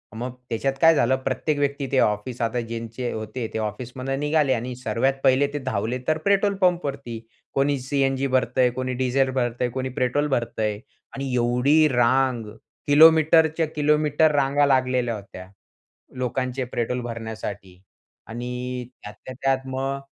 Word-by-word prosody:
मग 120 +2 -4 0.2
त्याच्यात 135 +4 -1
काय 165 -1 +7
झालं, 130 -1 +3
प्रत्येक 145 +3 -1
व्यक्ती 140 -1 -1
ते 135 - +3
ऑफिस 105 +4 0
आता 115 +1 0
ज्यांचे 115 +1 -5
होते 110 +2 -5
ते - - -2
ऑफिसमधून 125 +5 -4
निघाले 150 -2 +2
आणि 125 +1 -3
सर्वात 125 +2 0
पहिले 135 +2 +4
ते 145 - -2
धावले 110 +4 -1
तर 155 0 +2
पेट्रोल 200 0 +3
पंपवरती. 140 - -1 0.3
कोणी 140 +1 +1
सी-एन-जी 135 0 0
भरतंय, 125 -1 +2
कोणी 130 +1 -3
डिझेल 130 +1 +2
भरतंय, 120 -1 -1
कोणी 130 +1 -3
पेट्रोल 130 +4 +1
भरतंय 115 -5 -1 0.4
आणि 135 -2 -4
एवढी 125 +6 +3
रांग, 125 -1 +2 0.4
किलोमीटरच्या 160 +1 +5
किलोमीटर 150 +1 +3
रांगा 140 +1 +3
लागलेल्या 130 -3 +1
होत्या, 95 -3 -10 0.7
लोकांचे 130 +1 -2
पेट्रोल 125 +1 -1
भरण्यासाठी 110 -5 -7 0.5
आणि 125 +1 -5 0.2
त्यातल्या 105 +5 -10
त्यात 135 0 +1
मग 135 +1 -3
130 Hz, 135 wpm, -24 LUFS, 120-140 Hz, 0.7 s, काय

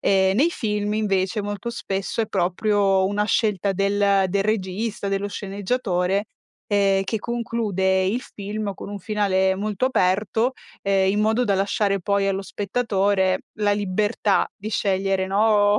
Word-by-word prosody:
Ehm, 190 0 +3
nei 300 +8 +4
film 210 -7 -2
invece 200 -1 0
molto 205 +3 -4
spesso 195 -1 -3
è - - -3
proprio 195 +1 +2
una 205 +1 0
scelta 205 -2 +1
del 200 0 +2
del 195 +2 +1
regista, 205 0 -2
dello 195 +1 -1
sceneggiatore, 200 -1 -1 0.4
ehm, 195 -2 +2
che 220 +3 -2
conclude 210 -5 0
il 230 +6 0
film 205 -1 -5
con - - -9
un 205 - -5
finale 190 -1 +1
molto 210 +4 -1
aperto, 220 +1 +1 0.3
ehm, 195 -1 +2
in 205 +2 0
modo 220 +3 +2
da 200 -4 +1
lasciare 200 0 +1
poi 200 +2 +1
allo 195 0 -1
spettatore 200 -3 0 0.2
la 205 -1 +3
libertà 205 +1 +1
di 210 - -6
scegliere, 195 -1 0
no, 205 +1 +3
200 Hz, 145 wpm, -23 LUFS, 195-210 Hz, 0.4 s, nei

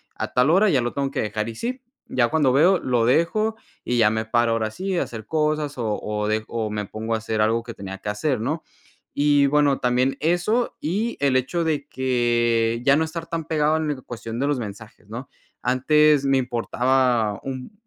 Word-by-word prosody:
a - - -5
tal 125 +3 +3
hora 195 +6 +5
ya 135 -7 +3
lo 120 0 -2
tengo 140 -1 -2
que - - -2
dejar 105 0 -2
y - - -6
sí. 250 - -4 0.3
Ya 120 -2 +2
cuando 150 -5 +2
veo 175 +7 +5
lo 120 -3 +1
dejo, 170 - +2 0.3
y, 120 - -1
ya 110 -2 +5
me 110 +1 -1
paro 120 +1 +2
ahora 110 -1 -1
sí 190 - -3
a - - +2
hacer 110 -2 -9
cosas, 150 -2 -1
o 110 -4 -1
o, 105 0 -2
de 110 0 0
o 110 -2 -3
me 105 -1 -3
pongo 110 +3 -4
a - - +2
hacer 110 0 -2
algo 115 +2 +2
que 115 0 -8
tenía 95 0 -7
que 105 - -5
hacer, 120 +5 -1
¿no? 150 +8 -2 0.6
Y 145 -1 +4
bueno, 145 -1 +3
también 125 +2 +1
eso, 175 +9 +1
y 205 +9 -2
el 140 -2 +2
hecho 135 +7 -1
de 150 -3 -1
que 120 -2 +1
ya 140 - +6
no 160 - +2
estar 165 +1 -5
tan 165 -2 -4
pegado 155 -1 +1
en 150 -3 -2
cuestión 115 -1 -6
de 140 - +1
los 145 -3 0
mensajes, 105 -1 -9
¿no? 120 +4 -7 0.4
Antes 150 +3 +3
me 135 0 +3
importaba 125 -2 +1
un 130 +4 -6
130 Hz, 210 wpm, -23 LUFS, 115-150 Hz, 0.6 s, ya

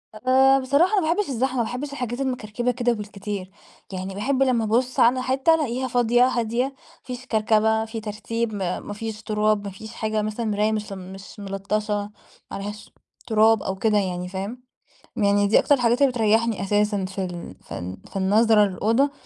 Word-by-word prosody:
آآ، 265 +4 +4
بصراحة 280 +9 +3
أنا 395 - +4
ما 330 - +3
باحبش 415 -4 -1
الزحمة، 260 +1 -1
ما 235 - +2
باحبش 255 +5 -4
الحاجات 250 -2 -4
المكركبة 245 -2 -1
كده 245 0 0
بالكتير، 205 -2 -6 0.4
يعني 190 +1 -5
باحب 265 +6 +1
لمّا 245 -4 +2
أبُص 245 +4 0
على 255 +2 +4
حتّة 270 +5 +3
ألاقيها 260 -4 -1
فاضية، 245 0 +3
هادية، 240 0 0
ما 275 - -5 0.3
فيش 250 0 -7
كركبة، 220 -1 +2
في 225 0 -6
ترتيب، 220 +1 -3
م - - -4 0.3
ما 205 - -4
فيش 220 0 -6
تراب، 210 -1 +1
ما 200 - -4
فيش 220 +3 -10
حاجة 215 -1 -1
مثلًا 215 +2 -3
مرايا 210 +1 +1
مش 210 -2 -3
مش 190 +2 -9
ملطشة، 200 +2 -2 0.6
ما 195 - -4
عليهاش 205 +1 -7 0.4
تراب 220 -1 +4
أو 190 - -2
كده 210 +1 +2
يعني 180 -2 -1
فاهم؟ 200 +7 -6 0.5
يعني 205 -1 +3
دي 215 - +5
أكتر 285 - +4
الحاجات 245 +1 +1
اللي 275 -2 +5
بتريحني 225 -1 +1
أساسًا 205 -1 +1
في 190 0 -4
ال 175 -1 -7
في - - -7
ال 90 +2 -6
في - - -19
النظرة 210 +2 +4
للأوضة، 225 +9 +1
220 Hz, 185 wpm, -24 LUFS, 205-250 Hz, 0.6 s, دي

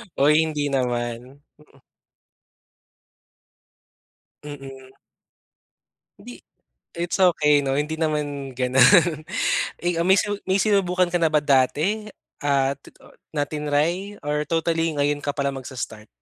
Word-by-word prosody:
Oy, 150 +3 +4
hindi 150 -2 -2
naman. 125 +1 -3 0.2
Mm. 140 -3 -23 2.6
Mm. 135 -2 -10 1.3
Hindi - - -12 0.5
it's 175 +2 -3
okey 150 -5 +4
'no, 135 - 0
hindi 150 +2 -2
naman 145 -4 -2
ganun. 135 +6 +4 0.6
Eh, 175 -1 0
ah, 170 - 0
may 190 - +6
su 205 -1 -1
may 190 +1 +2
sinubukan 185 -4 +1
ka 175 - +1
na 165 - +3
ba 150 -1 +2
dati 150 +10 +1 0.3
at 140 -1 0
ti - - -18
ah, - - -17 0.2
na 145 - 0
tinry? 155 +7 -1
Or 150 +1 -2
totally 165 -1 0
ngayon 145 0 0
ka 145 -1 -2
palang 140 -2 -2
magsa-start? 120 -5 -7
150 Hz, 120 wpm, -23 LUFS, 135-170 Hz, 2.6 s, may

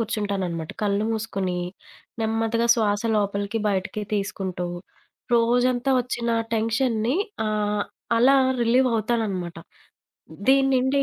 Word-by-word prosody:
కూర్చుంటాననమాట. 200 -7 -2
కళ్ళు 205 0 +1
మూసుకొని, 195 -5 -2 0.6
నెమ్మదిగా 225 +1 0
శ్వాస 210 -3 +1
లోపలికి 200 +1 -1
బయటికి 195 +1 -2
తీసుకుంటూ. 195 -3 -3 0.7
రోజంతా 245 +2 +2
వచ్చిన 240 -1 -2 0.2
టెన్షన్‌ని 230 +2 +1 0.3
ఆహ్, 210 -1 0 0.4
అలా 265 +4 +6 0.3
రిలీవ్ 250 +3 +3
అవుతాననమాట. 215 -6 -1 0.9
దీన్నిండి 270 0 +4
220 Hz, 85 wpm, -24 LUFS, 200-240 Hz, 0.9 s, అలా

